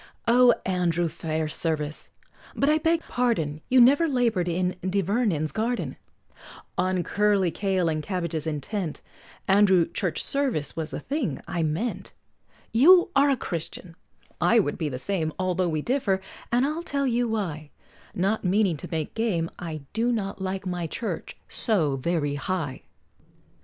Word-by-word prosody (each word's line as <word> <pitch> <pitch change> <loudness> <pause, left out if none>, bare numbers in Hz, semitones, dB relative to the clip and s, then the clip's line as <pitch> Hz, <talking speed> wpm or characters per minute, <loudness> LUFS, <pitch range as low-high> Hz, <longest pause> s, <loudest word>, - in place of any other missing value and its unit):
] - - -40
O 250 -1 +8
Andrew 175 -2 +1
Fairservice, 155 -1 -2 0.5
but 275 - +1
I 310 +1 +4
beg 330 +1 +2
pardon, 165 -12 -1
You 255 - +5
never 280 +7 +6
labor'd 235 - +1
in 180 +1 0
Di 190 +2 0
Vernon's 195 -6 0
garden, 235 +3 -2 0.8
On 185 -1 +1
curly 205 -3 +2
kale 190 -2 0
and 155 -1 0
cabbages 170 -3 -3
intent, 160 +3 -3 0.5
Andrew 190 -3 +5
Churchservice 190 - -2
was 160 -1 -3
the - - -5
thing 255 - -2
I 170 - -2
meant, 160 +10 -2 0.6
You 350 +10 +6
are 280 +1 +5
a 275 - +2
Christian 170 -2 -6 0.5
I 235 - +4
would 185 -9 +1
be 155 -3 -1
the 130 - -4
same, 160 +1 -2
Although 185 -1 0
we 155 -2 -2
differ, 235 -7 +1 0.3
and 245 +2 +3
I'll 305 +3 -2
tell 280 -4 -1
you 240 -1 +1
why, 165 -9 -3 0.5
Not 195 +5 0
meaning 190 -2 +2
to - - -8
make 160 -2 -3
game, 185 -8 -1
I 160 -3 -5
do 230 +3 +1
not 200 -4 -3
like 190 +1 -3
my 175 -2 -2
Church 225 +8 -5
so 165 - +1
very 145 0 -1
High! 145 -2 -3
185 Hz, 150 wpm, -26 LUFS, 160-230 Hz, 0.8 s, O